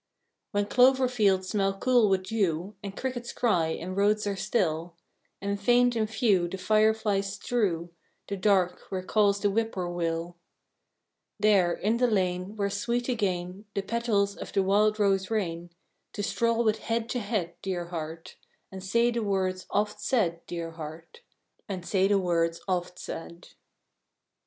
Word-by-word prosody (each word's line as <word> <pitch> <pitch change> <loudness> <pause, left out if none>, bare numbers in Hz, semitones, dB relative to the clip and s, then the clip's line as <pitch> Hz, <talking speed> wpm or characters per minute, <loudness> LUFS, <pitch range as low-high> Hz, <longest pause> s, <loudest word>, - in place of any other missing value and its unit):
When 205 -1 0
clover 255 +4 +4
fields 200 -6 +2
smell 195 -2 0
cool 245 -2 +4
with 190 -1 +2
dew, 190 -2 -1
And 200 -2 -7
crickets 245 -2 -4
cry, 180 -9 +1
and 175 +3 -4
roads 210 +1 +2
are 200 -1 -1
still; 175 -5 -1 0.4
And 200 0 -3
faint 245 +2 +4
and 220 -2 0
few 215 -6 +2
the 190 - -5
fire 215 +3 +3
flies 200 -3 -1
strew 195 -6 -1 0.4
The 200 - -3
dark 185 -2 +2
where 185 -1 -3
calls 200 0 +2
the 205 - +3
whippoorwill; 175 -5 -2 1.0
There, 200 -4 +4
in 215 +6 0
the 250 +1 +3
lane, 185 -2 -1
where 200 -1 -1
sweet 235 +5 -1
again 190 -4 -2
The 200 - -1
petals 205 -3 0
of - - -8
the 195 - +3
wild 210 +2 +3
rose 195 -2 +2
rain, 175 -6 -2 0.4
To 205 - -3
stroll 230 +3 +1
with 215 -1 +1
head 230 0 -2
to 245 - -1
head, 200 -6 -2
dear 175 -3 -3
heart, 165 -1 -6 0.3
And 190 -1 -8
say 235 +5 +2
the 235 0 -1
words 190 -3 -1
oft 210 0 -1
said, 210 -8 0
dear 170 -1 -4
heart, 165 - -9 0.5
And 185 -3 -4
say 190 0 +2
the 200 0 +3
words 170 -3 +1
oft 180 -1 -2
said! 170 +1 -8
200 Hz, 155 wpm, -28 LUFS, 180-220 Hz, 1.0 s, clover